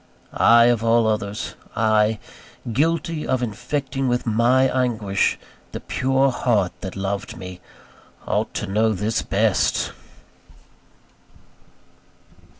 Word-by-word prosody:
I, 115 0 +6
of 120 -2 +2
all 115 0 +3
others 105 -1 -2 0.2
I, 110 0 +2 0.6
guilty 165 +3 0
of 130 -1 0
infecting 135 +4 -3
with 125 0 0
my 120 +3 +3
anguish 115 -7 0 0.4
the - - -4
pure 135 +1 +1
heart 110 -7 +1
that 95 -3 -6
loved 100 +1 -4
me 90 -1 -9 0.6
ought - - -1
to - - -2
know 110 +3 +1
this 105 +3 -1
best! - - +1
115 Hz, 105 wpm, -22 LUFS, 105-130 Hz, 0.6 s, I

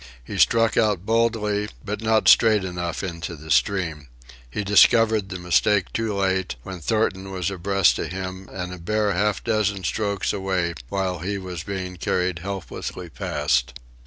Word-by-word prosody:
He - - -6
struck 115 -1 +4
out 105 -5 +2
boldly, 110 -2 +1 0.2
but 105 +1 -4
not 110 -1 +2
straight 110 -3 +6
enough 90 -1 -4
into 85 -2 -5
the 80 +1 -9
stream. 85 -7 +1 0.4
He 105 - -3
discovered 110 0 +4
the 90 - -4
mistake 95 +3 +2
too 110 -2 -1
late, 95 -4 0
when 95 -1 -7
Thornton 95 0 0
was 95 -1 -2
abreast 95 0 +2
of - - -2
him 95 +1 -6
and 90 -1 -5
a 90 - -8
bare 105 +4 0
half 105 +3 0
dozen 105 -4 0
strokes 100 +1 -1
away 95 -3 -1 0.2
while 95 -2 -1
he 100 +5 -3
was 90 -4 -6
being 95 -1 -5
carried 90 +1 -1
helplessly 95 +1 -6
past. 65 -4 0
95 Hz, 160 wpm, -23 LUFS, 90-105 Hz, 0.4 s, straight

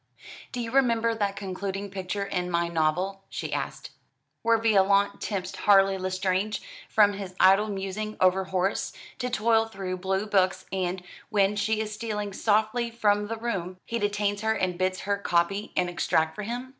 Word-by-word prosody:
"Do 250 - -4
you 230 -1 -4
remember 230 -4 +3
that 205 -3 -1
concluding 195 0 -4
picture 195 +1 -3
in 180 -2 -2
'My 170 0 0
Novel,'" 180 +4 0
she - - -4
asked, - - -4 0.5
"where 230 0 +4
Violante 200 -2 +3
tempts 190 -3 -3
Harley 195 -1 +5
Lestrange 185 +2 -1 0.3
from 205 -2 +5
his 195 -2 -7
idle 195 +3 +6
musing 205 +2 -4
over 185 +1 +3
Horace, 190 +1 -1 0.3
to 250 - -1
toil 225 -1 +2
through 190 -4 -5
blue 190 +2 -1
books; 185 -2 +1
and, 185 -1 -2 0.3
when 205 -1 +2
she 215 +1 0
is 215 -1 -4
stealing 210 -2 -4
softly 220 +4 +1
from 210 -3 +1
the 225 +1 -4
room, 190 -6 -3
he 235 - -2
detains 205 0 0
her 220 0 +2
and 185 -4 -1
bids 185 0 0
her 200 0 -1
copy 195 +3 0
an 180 - +2
extract 160 -2 +1
for 210 - -6
him? 240 +4 -4
200 Hz, 170 wpm, -27 LUFS, 185-215 Hz, 0.5 s, idle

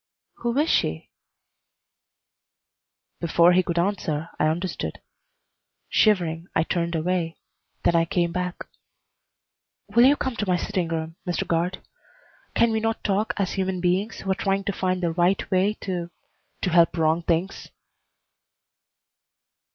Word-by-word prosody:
"Who 235 +1 -2
is 300 +2 +3
she?" 80 - 0 2.1
Before 170 +1 +4
he 185 - +5
could 170 -1 -3
answer 170 -4 -1
I 155 - +3
understood. 175 +4 -3 0.9
Shivering, 175 -6 +2
I 160 - +3
turned 170 0 -1
away, 170 0 -1 0.5
then 170 - +3
I 165 0 +4
came 170 0 0
back. 180 0 -3 1.2
"Will 235 +4 +5
you 280 +2 +6
come 260 -4 -3
to 210 - -2
my 180 - +3
sitting 185 -2 -2
room, 165 0 -4
Mr. 175 - -1
Guard? 170 +2 -1 0.7
Can 235 0 +4
we 220 - +1
not 225 0 -2
talk 205 +1 0
as 195 -2 0
human 190 -1 -1
beings 185 +5 0
who 195 - -2
are - - +4
trying 195 -1 -1
to 200 0 -2
find 185 -1 -1
the 170 - +1
right 175 +3 +1
way 195 +3 +2
to 175 -3 -3 0.5
to 185 - +2
help 170 0 +4
wrong 160 +1 +2
things?" 170 +3 -1
180 Hz, 140 wpm, -24 LUFS, 170-195 Hz, 2.1 s, you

